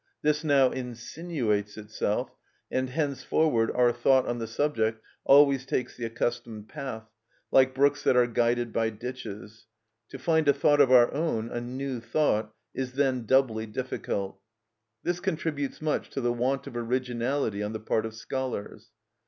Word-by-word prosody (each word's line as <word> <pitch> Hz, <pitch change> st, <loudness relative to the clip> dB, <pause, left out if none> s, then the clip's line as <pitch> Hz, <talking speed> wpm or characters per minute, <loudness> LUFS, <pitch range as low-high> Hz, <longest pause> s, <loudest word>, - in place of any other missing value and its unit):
This 150 Hz, +1 st, +2 dB
now 140 Hz, -4 st, +4 dB
insinuates 120 Hz, -4 st, -3 dB
itself, 105 Hz, -1 st, -2 dB, 0.4 s
and 130 Hz, 0 st, 0 dB
henceforward 140 Hz, -3 st, +1 dB
our 125 Hz, -1 st, +3 dB
thought 130 Hz, +2 st, +3 dB
on 120 Hz, 0 st, -2 dB
the 115 Hz, -, -3 dB
subject 115 Hz, -3 st, 0 dB, 0.3 s
always 140 Hz, -1 st, +6 dB
takes 130 Hz, -1 st, -2 dB
the 120 Hz, -, -4 dB
accustomed 115 Hz, -2 st, -3 dB
path, 110 Hz, -5 st, -6 dB, 0.4 s
like 130 Hz, 0 st, +4 dB
brooks 140 Hz, +1 st, +3 dB
that -, -, +3 dB
are 125 Hz, -, +6 dB
guided 120 Hz, 0 st, 0 dB
by 115 Hz, -1 st, +1 dB
ditches; 110 Hz, -2 st, -8 dB, 0.4 s
to -, -, -8 dB
find 160 Hz, -2 st, +1 dB
a 140 Hz, -, +6 dB
thought 145 Hz, +1 st, +4 dB
of 135 Hz, -2 st, +4 dB
our 120 Hz, -2 st, +6 dB
own, 130 Hz, -7 st, -1 dB
a 120 Hz, -, -3 dB
new 130 Hz, +1 st, -4 dB
thought, 115 Hz, -3 st, 0 dB, 0.2 s
is 130 Hz, -1 st, -4 dB
then 130 Hz, -4 st, 0 dB
doubly 115 Hz, -4 st, +2 dB
difficult. 100 Hz, -2 st, -4 dB, 0.6 s
This 175 Hz, 0 st, -1 dB
contributes 155 Hz, -4 st, -3 dB
much 155 Hz, -, -1 dB
to 135 Hz, -, -4 dB
the 120 Hz, -1 st, +1 dB
want 130 Hz, +3 st, -1 dB
of -, -, -9 dB
originality 120 Hz, -1 st, -1 dB
on 105 Hz, 0 st, -2 dB
the 110 Hz, -, -4 dB
part 110 Hz, +1 st, -1 dB
of 110 Hz, -, -10 dB
scholars. 120 Hz, -3 st, -5 dB
125 Hz, 155 wpm, -27 LUFS, 115-140 Hz, 0.6 s, always